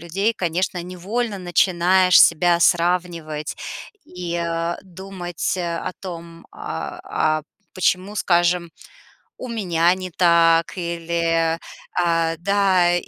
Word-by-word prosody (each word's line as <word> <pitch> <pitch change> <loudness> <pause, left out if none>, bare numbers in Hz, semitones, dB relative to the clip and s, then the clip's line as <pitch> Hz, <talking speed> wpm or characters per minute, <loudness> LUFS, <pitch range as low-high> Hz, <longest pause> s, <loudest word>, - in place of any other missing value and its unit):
людей, 195 +7 -1
конечно, 180 -2 -2
невольно 200 +6 -3
начинаешь 180 +1 +3
себя 175 +1 +4
сравнивать 170 -3 0 0.5
и, 180 -1 -6
э, 170 0 -2
думать, 185 -2 -5
э, 170 -2 -2
о - - -4
том, 170 -2 -9
а, - - -6 0.4
а, - - -21 0.3
почему, 185 +2 0
скажем, 175 -2 +1 0.7
у 255 - -7
меня 180 -6 +1
не 185 -1 -6
так 170 -1 +3
или, 170 -1 -1 0.4
а, 165 -2 +1
да, 185 -1 +2
175 Hz, 105 wpm, -21 LUFS, 170-185 Hz, 0.7 s, себя